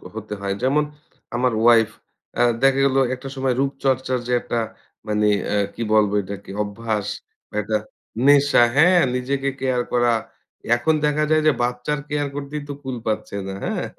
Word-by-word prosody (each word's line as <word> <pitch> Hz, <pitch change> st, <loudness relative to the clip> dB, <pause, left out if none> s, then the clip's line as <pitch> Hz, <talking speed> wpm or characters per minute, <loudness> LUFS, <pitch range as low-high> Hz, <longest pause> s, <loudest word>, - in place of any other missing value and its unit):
হতে 110 Hz, -1 st, -6 dB
হয়। 100 Hz, 0 st, -2 dB
যেমন 140 Hz, +4 st, +3 dB, 0.5 s
আমার 125 Hz, 0 st, +1 dB
ওয়াইফ 115 Hz, -2 st, +5 dB, 0.5 s
অ্যা 120 Hz, -, +2 dB, 0.2 s
দেখা 135 Hz, 0 st, +4 dB
গেলো 135 Hz, 0 st, +3 dB, 0.2 s
একটা 130 Hz, +2 st, -9 dB
সময় 130 Hz, -1 st, 0 dB
রূপচর্চার 135 Hz, -1 st, 0 dB
যে 125 Hz, -, 0 dB
একটা 120 Hz, -, -2 dB, 0.5 s
মানে 105 Hz, 0 st, +1 dB, 0.2 s
অ্যা 105 Hz, -, 0 dB, 0.2 s
কি 115 Hz, -, -4 dB
বলবো 105 Hz, -2 st, +4 dB
এটাকে? 100 Hz, 0 st, -8 dB
অভ্যাস 105 Hz, 0 st, -3 dB, 0.4 s
বা -, -, -13 dB
একটা 110 Hz, +1 st, 0 dB, 0.5 s
নেশা 140 Hz, -3 st, +6 dB
হ্যাঁ, 175 Hz, +4 st, +6 dB
নিজেকে 135 Hz, +2 st, -1 dB
কেয়ার 130 Hz, -2 st, 0 dB
করা। 120 Hz, -1 st, +3 dB, 0.6 s
এখন 160 Hz, +7 st, +1 dB
দেখা 150 Hz, +1 st, +1 dB
যায় 155 Hz, 0 st, +4 dB
যে -, -, +7 dB
বাচ্চার 125 Hz, +5 st, -1 dB
কেয়ার 145 Hz, -1 st, -1 dB
করতেই 145 Hz, +1 st, -5 dB
তো -, -, -3 dB
কুল 130 Hz, -1 st, -4 dB
পাচ্ছে 110 Hz, -2 st, -2 dB
না, 95 Hz, -, -4 dB
হ্যাঁ? -, -, -2 dB
125 Hz, 165 wpm, -22 LUFS, 110-140 Hz, 0.6 s, যে